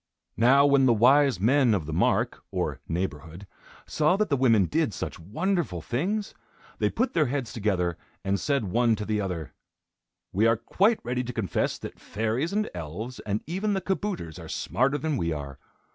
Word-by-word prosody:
Now 135 +5 +5
when 140 -2 +5
the 120 - +5
wise 130 0 +5
men 120 +2 +4
of 85 -6 -2
the 80 - -5
mark, 80 - +1
or - - -2
neighborhood, 85 +1 -4 0.4
saw 155 +5 +2
that 210 -1 0
the 140 - +3
women 115 -7 +4
did 150 - 0
such 85 - -5
wonderful 155 - -1
things, 185 - -2 0.5
they - - +2
put 250 +3 -1
their 155 -4 +3
heads 130 -2 -3
together 90 -6 -1 0.3
and 100 0 +1
said 140 -4 0
one 115 +4 +2
to 105 0 -5
the 105 -1 0
other: 90 -6 -4 0.8
"We 105 +4 +3
are 115 0 +3
quite 200 - +2
ready 125 +1 -1
to 125 - -5
confess 95 -9 -1
that - - -9
fairies, 115 +9 -2
and 210 +1 0
elves, 90 +10 -6
and 105 +1 -1
even 195 +6 -1
the - - +1
kabouters 185 - -3
are - - -9
smarter 130 +9 0
than 150 0 -1
we 85 -6 -1
are. 70 -3 -6
120 Hz, 180 wpm, -27 LUFS, 95-145 Hz, 0.8 s, Now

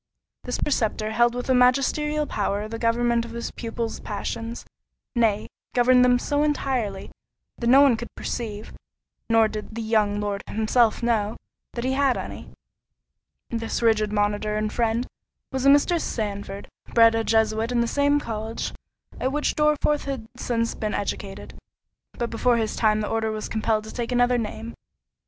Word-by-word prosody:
This - - -2
preceptor 220 -6 0
held 240 +2 +3
with 245 - -4
a 260 - +3
magisterial 275 +4 +2
power 205 -3 -2
the 225 +1 -6
government 235 0 +2
of 230 0 -8
his 235 0 -4
pupil's 230 -1 -4
passions; 225 +3 -5 0.5
nay, 220 -4 +1 0.3
governed 250 +1 +5
them 250 0 +5
so 290 +4 0
entirely, 260 -9 -1 0.5
that 235 - -1
no 265 +3 +7
one 275 -4 +6
could 235 +1 -6
perceive 215 -3 -5 0.6
(nor 225 -1 +5
did 215 +1 -7
the 230 - -3
young 210 -2 +1
Lord 205 -1 -2
himself 220 +2 +2
know) 220 -2 0 0.4
that 235 - -4
he 260 +1 0
had 275 -1 +2
any. - - -7 1.0
This 230 0 -2
rigid 215 -2 +3
monitor 210 0 0
and 215 0 -2
friend 230 +1 0 0.5
was 265 0 0
a - - +8
Mr. 305 +4 +4
Sandford, 200 -2 -4 0.3
bred 230 -1 +7
a 225 0 0
Jesuit 220 +1 +1
in 240 -1 +2
the 235 - +1
same 285 +3 +2
college 225 -3 -4 0.5
at 260 - 0
which 295 +1 0
Dorriforth 300 -1 +2
had 265 -5 -4
since 230 -2 -1
been 215 -1 -3
educated, 200 -1 -4 0.6
but 235 -1 -3
before 240 +1 +2
his 220 -2 -1
time 215 -1 +2
the 210 - -2
order 225 0 0
was 215 -1 -4
compelled 220 -1 0
to 220 - -9
take 240 0 -3
another 245 0 +3
name. 225 +1 -5
230 Hz, 165 wpm, -24 LUFS, 215-250 Hz, 1.0 s, a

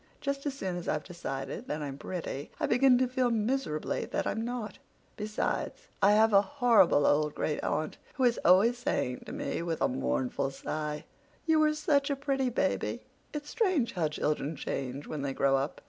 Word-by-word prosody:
Just 280 0 -2
as 280 - -2
soon 190 -9 -3
as 175 - -6
I've 150 - 0
decided 135 -7 -5
that 150 0 -3
I'm 140 -2 -4
pretty 160 -6 -5
I - - +1
begin 250 +1 +5
to 255 0 +2
feel 255 0 +1
miserably 225 - -1
that - - -2
I'm 220 - -1
not. 235 -4 -4 0.4
Besides, 215 - -3
have 210 +2 +5
a 195 - +8
horrible 230 - +4
old 150 0 +2
great 150 - -1
aunt 155 +2 -2 0.2
who 265 - 0
is 240 -2 +3
always 210 +7 +5
saying 245 - -1
to - - -6
me, - - -3
with 165 -1 -2
a - - +3
mournful 65 - -1
sigh, 150 +2 -4 0.4
'You 320 -1 +4
were 305 0 +3
such 290 -2 +2
a 280 - +1
pretty 275 -2 0
baby. 240 - -1 0.3
It's 295 0 -6
strange 370 - +1
how 170 -4 +1
children 150 0 -1
change 135 0 -4
when 150 - -5
they 140 -1 -2
grow 135 0 +3
up. 135 +2 -2
205 Hz, 185 wpm, -30 LUFS, -, 0.4 s, a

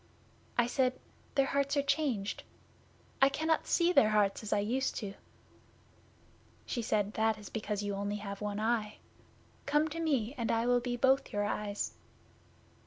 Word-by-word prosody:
I 240 - +5
said 255 +1 +1 0.4
"Their 275 - +4
hearts 280 +1 0
are 280 - +3
changed. 275 -8 0 0.8
I 270 - +7
cannot 315 +3 0
see 350 0 +3
their 215 - +6
hearts 205 -2 +2
as 215 - -6
I - - +3
used 240 +7 0
to." 200 -3 -4 1.5
She 240 - -2
said, 210 -2 0
"That 220 0 +1
is 210 -2 -10
because 210 -2 -3
you 205 - -2
have 200 - -3
only 205 +1 -2 0.2
one 210 0 -3
eye. 220 -1 0 0.7
Come 295 +2 +3
to 330 +2 -5
me 270 -8 0
and 230 - -1
I 230 +1 +1
will 245 0 +4
be 245 0 -3
both 265 +2 +3
your 205 0 0
eyes." 205 0 -2
230 Hz, 165 wpm, -32 LUFS, 210-275 Hz, 1.5 s, I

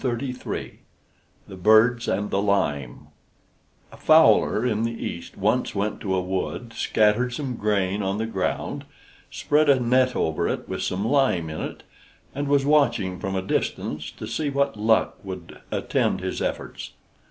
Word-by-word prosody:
THE 125 0 -4 0.7
BIRDS 110 +5 +4
AND 100 +2 -1
THE 100 - +1
LIME 75 -11 -1 0.8
A - - -13
fowler 110 - +5
in 110 -3 0
the 115 0 -1
East 85 - -7
once - - 0
went 100 +1 -2
to 95 -2 -1
a 95 - +1
wood, 95 +5 -4
scattered 110 +3 +2
some 135 -4 -3
grain 100 -2 0
on 95 0 -1
the 110 - -1
ground, 95 -5 -3 0.4
spread 150 0 +1
a 135 -2 +5
net 125 +1 +2
over 80 0 0
it - - -3
with - - -4
some 100 +4 -1
lime 115 - +2
in 80 - -5
it, - - -6 0.5
and 145 +1 -3
was 140 -1 +3
watching 115 - +2
from 95 +1 -3
a 95 - -1
distance 75 -4 -2
to - - -9
see 145 +7 -2
what 140 -2 0
luck 110 +1 +1
would 95 -3 -8
attend - - 0
his - - -4
efforts. - - -4
110 Hz, 155 wpm, -24 LUFS, 95-125 Hz, 0.8 s, fowler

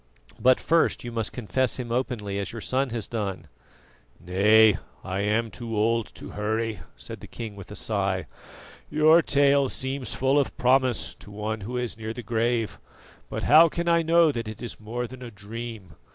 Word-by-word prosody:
But 130 0 +5
first 165 0 +2
you 120 - -5
must 115 -2 -2
confess 125 +2 -1
Him 120 -2 -5
openly, 115 -5 -2
as 100 - -4
your 115 - -7
son 130 +4 0
has 115 -3 -4
done." 100 -6 -3 0.7
"Nay, 105 +3 +5 0.3
I 95 +1 -3
am 110 +2 0
too 115 -3 -5
old 115 +1 +2
to - - -9
hurry," 110 0 -2 0.2
said - - -8
the - - -11
king 110 -3 -7
with 100 -2 -11
a 105 - -8
sigh. 100 -5 -1 0.6
"Your 155 +2 +6
tale 140 -2 +3
seems 130 0 -3
full 135 +2 +3
of 140 - -2
promise 125 -7 +2
to - - -15
one 105 +1 -4
who 120 +5 -4
is 120 -2 -3
near 110 0 -4
the 125 - -7
grave; 115 -1 0 0.5
but - - -4
how 160 +3 +7
can 170 +2 -3
I 170 0 +4
know 165 -1 +4
that 115 -5 -4
it 110 +2 -7
is 120 - -6
more 115 +3 -4
than 130 +1 -10
a 125 - -7
dream? 105 -3 -8
115 Hz, 185 wpm, -26 LUFS, 105-130 Hz, 0.7 s, how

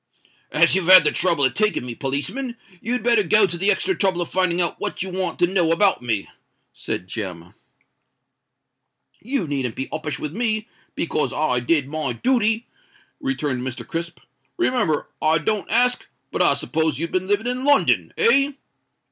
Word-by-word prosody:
"As 165 +2 +4
you've 190 -2 0
had 185 -2 +9
the 150 - +2
trouble 165 -6 +2
of 130 - +1
taking 210 - 0
me, 120 - -5
policeman, 190 - -3 0.2
you'd 245 +3 -2
better 235 -2 +4
go 210 +1 +5
to 175 - -3
the 195 +4 +1
extra 380 - +1
trouble 190 -3 0
of 175 - -2
finding 185 -2 +1
out 170 -2 0
what - - -3
you 190 - -6
want 180 -2 -2
to - - +4
know 175 -2 +1
about 190 -2 +3
me," 110 -5 -2 0.5
said 90 - -4
Jem. 90 -4 -6 1.7
"You 250 -4 -2
needn't 135 -5 -3
be 135 - -4
uppish 155 -1 -4
with 150 0 -5
me, 215 0 -1 0.3
because 155 -2 -1
I 150 -5 0
did 135 +3 +1
my 150 -3 -3
dooty," 225 - +1 0.5
returned 155 - -2
Mr. 125 -2 -5
Crisp. 165 +6 -5 0.4
"Remember, 250 - 0
I 155 +1 +3
don't 200 +6 -2
ask—but 245 +2 0
I - - +5
s'pose 160 -1 -1
you've 165 +3 -3
been 185 0 -1
living 205 +3 0
in 250 +1 -2
London—eh?" 285 +2 +3
175 Hz, 165 wpm, -22 LUFS, 150-220 Hz, 1.7 s, had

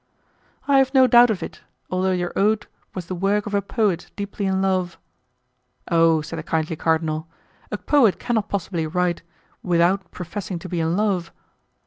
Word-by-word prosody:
"I 275 -1 +5
have 265 +1 +1
no 260 -1 +7
doubt 245 -1 +7
of 210 -4 -1
it, - - -8 0.3
although 185 +1 +1
your 180 -1 -2
ode 210 +1 +2 0.3
was 185 -3 -5
the 185 - -5
work 195 +3 0
of 205 - -6
a 200 - +2
poet 200 -4 -1
deeply 200 0 -3
in 190 0 +1
love." 185 -2 0 0.9
"Oh!" 165 -1 +4
said 165 +2 -6
the - - -3
kindly 160 -1 -2
cardinal, 160 0 0 0.4
"a - - -3
poet 255 -10 +3
cannot 220 -4 -1
possibly 175 -4 -2
write 175 +1 0 0.4
without 175 +1 +1
professing 180 +1 -6
to 175 - -8
be 175 -1 -3
in 165 +2 0
love." 195 -5 0
185 Hz, 170 wpm, -22 LUFS, 170-205 Hz, 0.9 s, no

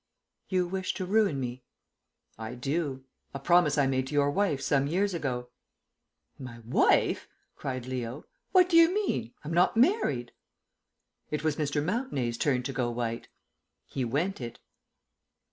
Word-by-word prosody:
"You 185 -2 +1
wish 190 +1 -2
to 185 - -3
ruin 195 -7 +2
me?" 125 0 -5 0.7
"I 110 +2 -6
do. 135 +1 -2 0.3
A - - -3
promise 170 0 +4
I 145 - +4
made 130 -1 0
to 145 - -5
your 145 0 +3
wife 175 -5 +1
some 140 0 +1
years 190 +5 +1
ago." 125 -7 -3 0.9
"My 130 -3 -8
wife?" 120 - +3 0.3
cried 130 -2 -4
Leo. 125 0 -5 0.3
"What 365 -1 +5
do 335 - +5
you 335 +1 +7
mean? 385 - -1
I'm 155 +2 -4
not 180 +6 +3
married." 235 - +2 1.0
It 150 0 -3
was 155 -2 0
Mr. 145 -1 0
Mountenay's 170 - -1
turn 130 -4 +1
to 135 - -4
go 125 -1 0
white. 115 -1 -3 0.6
He 130 - -3
went 145 +9 -1
it. 120 -1 -6
145 Hz, 150 wpm, -29 LUFS, 125-180 Hz, 1.0 s, you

